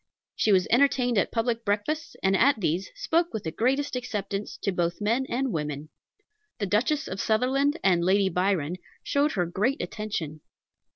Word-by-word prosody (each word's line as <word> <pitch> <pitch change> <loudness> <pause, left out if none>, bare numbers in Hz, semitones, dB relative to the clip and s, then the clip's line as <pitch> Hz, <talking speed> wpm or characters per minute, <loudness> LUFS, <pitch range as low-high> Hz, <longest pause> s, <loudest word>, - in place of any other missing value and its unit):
She 215 - +2
was 185 -2 +4
entertained 245 -2 +3
at - - 0
public 230 0 -1
breakfasts, 215 +10 -2
and 190 0 +3
at 260 +4 +4
these 175 0 -1
spoke 340 -8 0
with 220 -3 -4
the 160 - -3
greatest 265 - 0
acceptance 210 -5 -4
to 200 - +1
both 175 -1 -1
men 230 +5 0
and 260 +1 -1
women. 150 -1 -4 0.7
The 205 - -1
Duchess 265 - +1
of 190 - -4
Sutherland 270 +7 +1
and 175 -3 +3
Lady 195 +2 +3
Byron 180 -3 0 0.3
showed 285 +2 +1
her 180 -4 0
great 210 - 0
attention. 165 -8 -4
210 Hz, 165 wpm, -26 LUFS, 185-260 Hz, 0.7 s, was